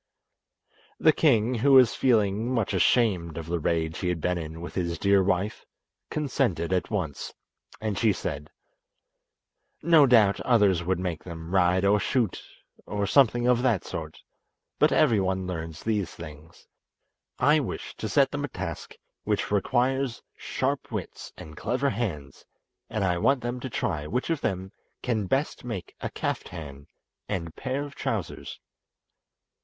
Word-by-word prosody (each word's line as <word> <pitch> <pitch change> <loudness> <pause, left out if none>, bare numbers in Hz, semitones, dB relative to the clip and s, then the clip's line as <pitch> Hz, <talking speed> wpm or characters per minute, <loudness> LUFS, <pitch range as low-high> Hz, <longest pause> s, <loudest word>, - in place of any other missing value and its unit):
The 155 - +5
king, 125 -7 +3
who 130 +4 +3
was 130 -3 +7
feeling 110 -2 +2
much 115 -6 0
ashamed 95 -4 +2
of 80 - -5
the 85 +1 -2
rage 80 0 -1
he 90 - -2
had 90 -2 -1
been 90 +2 0
in 80 0 -7
with 85 - -7
his 85 -3 -2
dear 100 +1 +4
wife, 95 +2 -1 0.5
consented 120 - 0
at 90 - 0
once, 90 -10 -3 0.5
and 110 -2 -2
she 110 -3 +4
said: 75 -6 -4 1.3
"No 160 -4 +6
doubt 110 -5 +5
others 100 -8 +3
would 90 +1 0
make 90 -3 -3
them 85 0 -8
ride 90 0 +3
or 105 +1 +4
shoot, 115 -1 0 0.5
or 100 -1 -1
something 120 +1 +4
of 125 -1 +3
that 120 -8 +2
sort, 80 -1 -6 0.6
but - - +5
every 120 -9 +4
one 95 0 -1
learns 80 -3 -5
these 105 -6 0
things. 80 0 -12 0.7
I 150 +2 +4
wish 135 - -5
to - - -4
set - - +3
them - - -3
a - - -1
task - - -6 0.3
which - - -1
requires 125 +4 +1
sharp - - -2
wits - - -6
and 80 0 -10
clever 125 - 0
hands, 75 - -4 0.5
and 110 - -1
I 90 -2 +1
want 135 +6 +3
them 120 +1 -3
to 130 - -5
try 75 -9 -2
which 125 - -1
of 160 - -1
them 95 0 -2 0.3
can 110 -5 -1
best 135 - -1
make 115 -8 -6
a - - -2
kaftan 70 -5 -5 0.4
and 85 -3 -3
pair 130 +2 -2
of 145 -1 -8
trousers." - - -4
100 Hz, 155 wpm, -27 LUFS, 85-120 Hz, 1.3 s, was